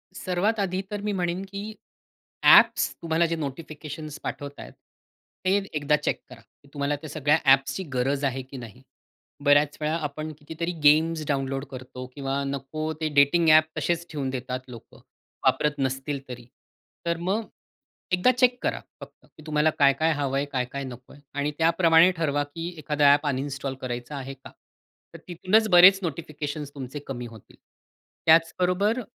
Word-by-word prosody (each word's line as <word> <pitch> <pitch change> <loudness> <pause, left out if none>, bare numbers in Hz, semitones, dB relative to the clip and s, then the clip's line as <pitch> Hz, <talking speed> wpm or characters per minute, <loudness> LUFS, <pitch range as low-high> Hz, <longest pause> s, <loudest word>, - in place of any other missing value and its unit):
सर्वात 195 +5 -1
आधी 190 -1 -1
तर 205 -1 -3
मी 210 0 -2
म्हणेन, 180 0 -2
की 200 +2 -7 0.7
ॲप्स - - +6
तुम्हाला 165 0 +1
जे 165 0 -1
नोटिफिकेशन्स 155 0 -7
पाठवत 145 0 -6
आहेत, - - -10 0.7
ते 190 - +3 0.2
एकदा 150 0 +2
चेक - - -2
करा. - - -13 0.3
तुम्हाला 145 0 -1
त्या 150 +1 -9
सगळ्या 150 +1 +2
ॲप्सची 135 +6 +3
गरज 135 +3 0
आहे 135 -1 -1
की 130 +1 -11
नाही? 120 +1 -10 0.6
बऱ्याच 145 0 +4
वेळा 155 +2 0
आपण 155 +2 -7
कितीतरी 160 +3 -4
गेम्स 155 +2 +4
डाउनलोड 135 -1 -2
करतो 130 0 -8
किंवा 140 0 -2
नको 140 +3 -4
ते 155 - +1
डेटिंग 145 +4 +4
ॲप 155 0 +8
तसेच 170 0 -1
ठेवून 140 -3 -3
देतात 130 0 -4
लोकं 120 -3 -13 0.5
वापरत 150 - +3
नसतील 135 +1 -2
तरी. 120 -1 -8 0.6
तर 170 0 0
मग 195 +6 -1 0.7
एकदा 180 +8 +4
चेक 250 0 +2
करा - - -1 0.2
फक्त - - -13
की 155 - -18
तुम्हाला 150 0 +2
काय-काय 140 +3 +4
हवंय, 140 -1 -1
काय-काय 130 +1 -3
नकोय. 125 +1 -10 0.2
आणि 145 +1 -1
त्याप्रमाणे 165 +1 +5
ठरवा 145 -3 0
की 165 +4 -7
एखादा 145 -1 +3
ॲप 145 +1 0
अनइन्स्टॉल 135 0 -3
करायचं 125 +2 -5
आहे 135 0 -6
का? 135 - -14 0.6
तर - - -8
तिथूनच 185 +5 +2
बरेच 185 +2 +8
नोटिफिकेशन्स 150 -2 -5
तुमचे 135 +1 -6
कमी 125 -3 -5
होतील. 115 -3 -15 0.7
त्याचबरोबर 180 +7 +3
150 Hz, 150 wpm, -25 LUFS, 135-170 Hz, 0.7 s, ॲप